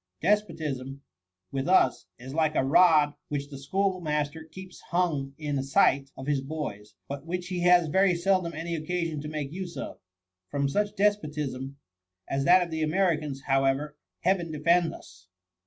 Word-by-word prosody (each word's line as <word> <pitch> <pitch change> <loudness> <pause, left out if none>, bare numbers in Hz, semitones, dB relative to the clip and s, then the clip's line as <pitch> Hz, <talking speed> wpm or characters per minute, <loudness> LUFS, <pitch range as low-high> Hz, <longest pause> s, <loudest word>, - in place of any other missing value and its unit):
Despotism, 145 -10 -1 0.5
with 135 0 -2
us, 180 -8 +3
is 130 +2 -9
like 155 -1 +1
a - - +3
rod 150 0 +5
which 145 -1 -4
the 140 -2 -8
schoolmaster 160 -2 -1
keeps 185 +3 -11
hung 170 -6 +1
up 135 - -17
in 145 -3 -2
sight 135 -2 +3
of 130 - -7
his 145 -1 0
boys, 135 -8 -6
but 140 +2 -7
which 175 0 -3
he 180 -1 -2
has 175 -1 +5
very 190 +3 +3
seldom 180 -1 +1
any 165 +2 -4
occasion 165 -1 -2
to 150 - -6
make 150 -2 -4
use 175 0 -6
of. - - -6 0.5
From 140 -1 0
such 205 +9 -1
despotism 150 -10 -1 0.5
as 135 0 -1
that 180 +1 +6
of 170 - -7
the 160 0 -2
Americans, 155 -4 0
however. 135 +2 +1 0.3
Heaven 175 -2 +1
defend 165 +3 +2
us 90 0 -14
155 Hz, 160 wpm, -27 LUFS, 140-180 Hz, 0.5 s, that